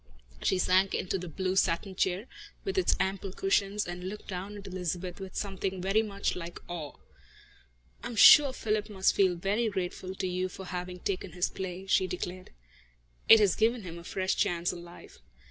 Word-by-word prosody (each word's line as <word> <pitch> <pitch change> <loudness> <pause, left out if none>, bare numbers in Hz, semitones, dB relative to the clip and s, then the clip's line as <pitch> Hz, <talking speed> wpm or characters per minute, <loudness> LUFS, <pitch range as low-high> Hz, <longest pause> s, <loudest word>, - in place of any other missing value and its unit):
She 190 - +2
sank 185 +1 +3
into 185 +1 -1
the 180 - -6
blue 185 +3 -2
satin 190 +1 +1
chair, 185 +3 0 0.4
with 390 - -3
its 375 - +3
ample 195 0 -1
cushions, 195 +2 0
and 180 +1 -5
looked 210 +1 -9
down 195 +2 -5
at 200 - -10
Elizabeth 180 -1 -4
with 190 -1 -8
something 190 -1 -3
very 195 +4 +2
much 200 -2 -2
like 175 -1 -7
awe. 160 -5 -6 1.1
"I - - -3
am 235 - -6
sure 280 +5 +9
Philip 215 -4 -2
must 190 -2 +2
feel 190 -3 +3
very 205 +6 0
grateful 185 -1 -4
to 190 - -3
you 185 +1 -1
for 190 +1 -9
having 180 0 -5
taken 185 -3 -3
his 180 0 0
play," 190 0 -6
she 190 -1 +2
declared. 185 0 -5 0.8
"It 225 - +10
has 200 -3 +4
given 225 +1 +1
him 170 -2 -7
a - - -12
fresh 190 +2 -1
chance 170 0 0
in 175 - -8
life." 175 0 -14
190 Hz, 185 wpm, -29 LUFS, 180-200 Hz, 1.1 s, It